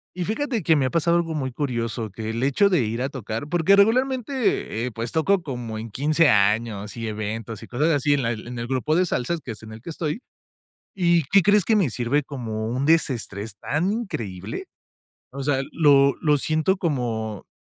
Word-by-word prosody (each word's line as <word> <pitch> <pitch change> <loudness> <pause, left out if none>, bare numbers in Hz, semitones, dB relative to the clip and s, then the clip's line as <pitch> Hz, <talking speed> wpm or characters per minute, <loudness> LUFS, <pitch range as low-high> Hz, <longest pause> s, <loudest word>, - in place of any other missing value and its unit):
Y 180 -1 -2
fíjate 235 - -1
que 160 -1 +3
me 140 -3 +2
ha 130 - -1
pasado 170 +1 +2
algo 165 -1 -1
muy 135 -4 -2
curioso, 120 -4 -3
que 110 +3 -6
el 115 +2 -2
hecho 140 +9 +3
de 175 -8 +3
ir 115 +3 -2
a 135 - -1
tocar, 115 0 -5
porque 175 +3 +4
regularmente, 245 - +1
eh, 125 - -3
pues 115 +1 -5
toco 185 +4 +2
como 120 -7 -5
en 115 +1 -6
15 150 +7 +2
años 105 0 +1
y 115 -1 -4
eventos 110 0 -5
y - - -10
cosas 145 +7 +1
así 145 -2 +2
en 145 - +1
la 115 -2 0
en 120 +2 -7
el 120 - -4
grupo 135 +4 0
de 180 +1 +3
salsas, 160 +5 -1
que 125 - -6
es 110 - -13
en 110 - -10
el 110 - -11
que 170 - -9
estoy, 160 +6 -3 0.7
¿y 170 -3 +3
qué 195 - +8
crees? 205 0 +4
Que 225 - +3
me 190 -9 +3
sirve 125 +5 0
como 110 -6 -4
un 130 +4 -1
desestrés 115 -10 0
tan 160 - -1
increíble. 115 - -5 0.6
O 135 +1 -6
sea, 135 -1 +1
lo 140 -3 +5
lo 150 -2 +3
siento 155 +6 +1
como, 115 - -2
135 Hz, 205 wpm, -24 LUFS, 115-170 Hz, 0.7 s, qué